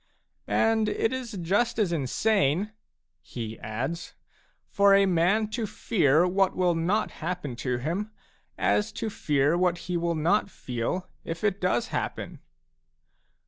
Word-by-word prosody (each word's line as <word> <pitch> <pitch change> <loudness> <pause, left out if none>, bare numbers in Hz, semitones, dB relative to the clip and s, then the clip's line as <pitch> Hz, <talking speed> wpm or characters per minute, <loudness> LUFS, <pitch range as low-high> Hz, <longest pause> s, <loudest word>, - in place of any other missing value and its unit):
" - - -47
And 225 -1 +2
it 225 +3 0
is 255 -3 -5
just 200 +6 0
as 205 -6 +1
insane," 175 - +1 0.5
he 115 -2 -7
adds, 130 +11 -4 0.5
"for 200 0 +5
a 195 0 +5
man 190 +4 +2
to 225 0 -2
fear 170 -7 +2
what 190 +1 +2
will 180 -1 +2
not 180 +6 0
happen 165 -6 -3
to 125 0 -1
him, 170 - -2 0.5
as 210 +1 +1
to 220 - -3
fear 145 -3 +1
what 175 -1 +2
he 180 -1 -1
will 170 0 0
not 170 +7 +2
feel 125 +6 -3 0.2
if 165 +3 -6
it 200 -2 0
does 180 -10 +1
happen." - - -4
180 Hz, 140 wpm, -27 LUFS, 155-210 Hz, 0.5 s, for